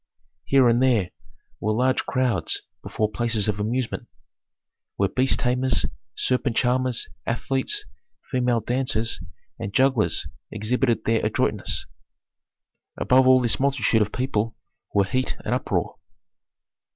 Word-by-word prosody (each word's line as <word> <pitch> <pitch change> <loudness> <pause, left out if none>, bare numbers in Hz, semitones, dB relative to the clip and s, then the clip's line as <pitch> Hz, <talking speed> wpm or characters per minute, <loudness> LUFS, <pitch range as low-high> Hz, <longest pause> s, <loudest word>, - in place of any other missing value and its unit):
Here 135 -2 +5
and 120 +1 +3
there 115 -9 +2 0.5
were 110 +1 0
large 130 +3 +1
crowds 125 -6 0 0.2
before 110 -1 -2
places 115 -2 0
of 105 -1 -1
amusement, 115 +3 -2 0.9
where 100 - +2
beast 130 +1 +2
tamers, 125 +1 +1 0.3
serpent 125 -2 0
charmers, 125 -1 +1 0.2
athletes, 135 - -1 0.5
female 125 -3 +1
dancers, 120 -3 0 0.4
and 110 -3 -4
jugglers 130 -10 +2 0.2
exhibited 115 +2 0
their 115 0 +2
adroitness. - - 0 1.1
Above 130 +1 +4
all 130 0 +7
this 120 -2 +2
multitude 135 -4 +2
of 105 0 0
people 115 -4 -1 0.4
were 100 -1 +3
heat 130 +6 -1
and - - 0
uproar. - - -1
125 Hz, 115 wpm, -24 LUFS, 110-130 Hz, 1.1 s, all